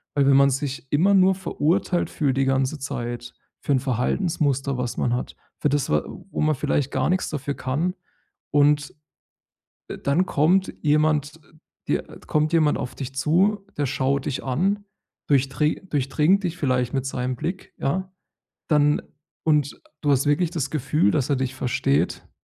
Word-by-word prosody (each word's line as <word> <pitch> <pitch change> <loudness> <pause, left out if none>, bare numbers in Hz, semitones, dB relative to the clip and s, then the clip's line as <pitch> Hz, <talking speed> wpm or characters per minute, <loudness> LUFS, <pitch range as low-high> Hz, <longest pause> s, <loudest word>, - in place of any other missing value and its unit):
Weil 140 - +3
wenn 140 - +6
man 140 0 +6
sich 135 0 -4
immer 180 +7 +4
nur 190 0 +5
verurteilt 180 0 0
fühlt 135 -4 0
die 135 - +3
ganze 135 +2 0
Zeit 120 -2 -5 0.3
für 145 - 0
'n 130 - +3
Verhaltensmuster, 135 - 0
was 125 -1 -3
man 120 - +1
hat, 125 - -3 0.3
für 150 - +2
das, 145 -1 0
wa 75 0 +2 0.3
wo - - -2
man 155 -1 +2
vielleicht 140 0 -1
gar - - 0
nix 185 - 0
dafür 140 -1 -3
kann, 155 +8 -1 0.6
und 145 0 +3 1.1
dann 150 +7 +3
kommt 180 +6 +2
jemand 150 0 +2 0.5
dir - - +1 0.2
kommt 155 +2 +1
jemand 155 -2 +3
auf 125 - -5
dich 135 -1 -6
zu, 190 +9 +2
der 145 - 0
schaut 135 +1 0
dich 140 -2 -2
an, 190 +10 0 0.4
durchdri 140 +2 +1
durchdringt 150 +8 +2
dich 175 -1 -2
vielleicht 125 -4 0
mit 135 -1 0
seinem 125 -1 -2
Blick, 185 +8 -5
ja, 185 +6 -1 0.6
dann 150 -1 +3 0.4
und 150 -3 +1 0.2
du 145 -2 +2
hast 135 +1 +2
wirklich 160 +3 +2
das 140 -6 -2
Gefühl, 140 -7 +1
dass 140 0 0
er 140 - +3
dich 130 0 -2
versteht. 135 +2 0
145 Hz, 160 wpm, -24 LUFS, 135-155 Hz, 1.1 s, wenn